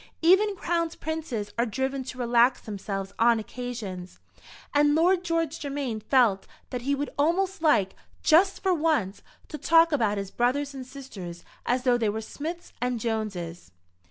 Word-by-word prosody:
Even 395 +4 +5
crowned 335 -2 -2
princes 300 -10 -4
are 235 - +3
driven 265 +4 -2
to 250 - -7
relax 245 +1 +3
themselves 195 -2 -5
on 235 0 +5
occasions, 220 -6 -6 0.6
and 290 0 +4
Lord 355 +3 +3
George 330 -2 -1
Germain 275 -6 -3
felt 220 -4 +2 0.2
that 250 - -3
he 280 +3 0
would 285 +1 -3
almost 365 +5 +1
like, 210 - +3 0.3
just 365 +5 +4
for 380 -1 +3
once, 305 - 0 0.3
to 300 - -7
talk 330 0 +5
about 220 -8 +1
his 195 -1 -4
brothers 275 +4 0
and 260 -2 -8
sisters 205 -11 -9 0.2
as 250 +1 +1
though 245 -2 +3
they 220 -3 +1
were 215 +2 -2
Smiths 320 +10 -6
and 245 -1 0
Joneses. 195 - -4
255 Hz, 155 wpm, -27 LUFS, 220-315 Hz, 0.6 s, Even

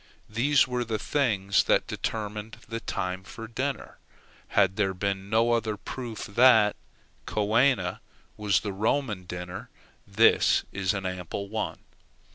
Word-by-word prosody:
These 140 +6 +3
were 125 -1 -1
the 110 -2 -2
things 105 -9 +1
that - - +3
determined 105 0 -4
the 115 +1 -4
time 95 -3 -3
for 115 +3 -9
dinner. 130 +4 -4 0.6
Had 95 0 +4
there 95 -2 0
been 100 +1 -2
no 115 +2 +3
other 110 -2 0
proof 120 -2 -6
that 110 -1 +5 0.5
coena 115 +6 +2 0.4
was 105 -2 +1
the 100 -2 -4
Roman 105 -1 -1
dinner, 90 +1 -7 0.4
this 105 +3 +4
is 100 0 -1
an 95 -1 -4
ample 90 +2 -4
one. 110 0 -3
105 Hz, 130 wpm, -27 LUFS, 100-115 Hz, 0.6 s, that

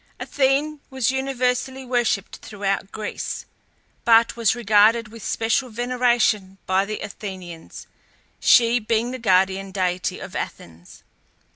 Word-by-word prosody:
Athene 285 +2 0
was 260 -1 0
universally 265 0 -1
worshipped 240 -5 -1
throughout 195 -2 -3
Greece, 215 -1 -5 0.6
but 230 0 +5
was 230 -2 +2
regarded 220 0 +3
with 230 +1 -12
special 230 +3 0
veneration 240 -5 +1
by 190 +1 +2
the 215 +1 -5
Athenians, 185 -5 -8 0.5
she 235 0 +5
being 230 +2 0
the 255 - -6
guardian 190 -2 +2
deity 185 -1 -1
of - - -9
Athens. 85 +1 -8
225 Hz, 115 wpm, -22 LUFS, 195-250 Hz, 0.6 s, but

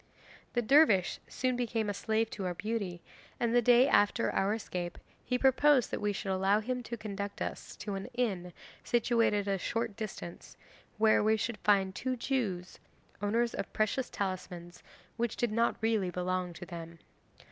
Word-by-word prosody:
'The 240 - +1
dervish 225 - +5
soon 255 0 -1
became 230 -3 -1
a 205 - -1
slave 220 +3 0
to 200 - -5
our 180 -1 -2
beauty, 195 -4 -3 0.4
and 235 -1 +1
the 245 - +5
day 245 +2 +6
after 205 +1 +3
our 195 +1 +1
escape 180 -5 -5 0.3
he 250 - 0
proposed 265 0 +4
that - - -3
we 210 0 +1
should 195 0 -3
allow 195 +2 +3
him 250 +3 -3
to 235 0 -6
conduct 200 -2 -5
us - - -5
to 205 -1 -5
an 195 0 -4
inn 195 -8 -1 0.3
situated 230 -4 +2
at 200 - +1
a 195 - -1
short 230 +2 -2
distance, 205 -5 -7 0.4
where 215 -1 +4
we 220 +1 +3
should 225 +1 -3
find 195 -2 +3
two 255 +5 -2
Jews, 225 -8 -2 0.4
owners 230 +3 +1
of - - -4
precious 215 +4 0
talismans 180 -3 -5 0.4
which 235 -1 -1
did 240 -3 0
not 230 +2 +2
really 220 -4 +1
belong 180 0 -2
to 175 - -9
them. 165 -1 -8
215 Hz, 170 wpm, -31 LUFS, 190-235 Hz, 0.4 s, day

